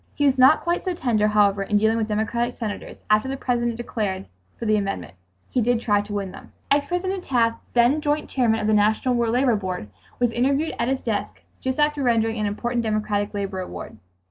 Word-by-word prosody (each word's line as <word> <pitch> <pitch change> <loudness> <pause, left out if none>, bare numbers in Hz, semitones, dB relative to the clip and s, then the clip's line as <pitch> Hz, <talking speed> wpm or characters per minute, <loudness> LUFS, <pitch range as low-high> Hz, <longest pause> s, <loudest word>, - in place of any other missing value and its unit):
He 290 - +1
was 270 -1 +3
not 265 +5 +7
quite 345 +1 -1
so 370 -2 -2
tender, 225 -9 +1
however, 205 -1 +3
in 205 +1 +1
dealing 220 +2 +3
with 220 -1 0
Democratic 230 +3 -1
senators, 215 -3 -6
after 215 +4 +4
the 270 - -3
President 240 -2 -1
declared 205 -5 -3 0.3
for - - -5
the 215 -1 +3
amendment. 195 - -3 0.4
He 250 - +1
did 240 +1 +2
try 205 -3 +2
to 205 0 -10
win 200 -2 -3
them. - - -13 0.2
Ex 285 0 +3
President 370 +2 -2
Taft, 230 -5 +1
then 245 +5 +4
joint 300 0 0
Chairman 230 -4 +1
of 215 - -2
the 215 - +2
National 215 +4 +2
War 235 -1 +1
Labor 245 0 +3
Board, 185 - -4 0.3
was 245 -1 +1
interviewed 275 +6 +1
at - - +1
his 265 0 0
desk 215 -3 -3 0.2
just 260 +2 -2
after 295 -1 +2
rendering 225 -3 +1
an 210 - 0
important 235 +4 -1
democratic 215 -2 -1
labor 195 -2 -3
award. 180 -10 -7
230 Hz, 210 wpm, -23 LUFS, 210-260 Hz, 0.4 s, not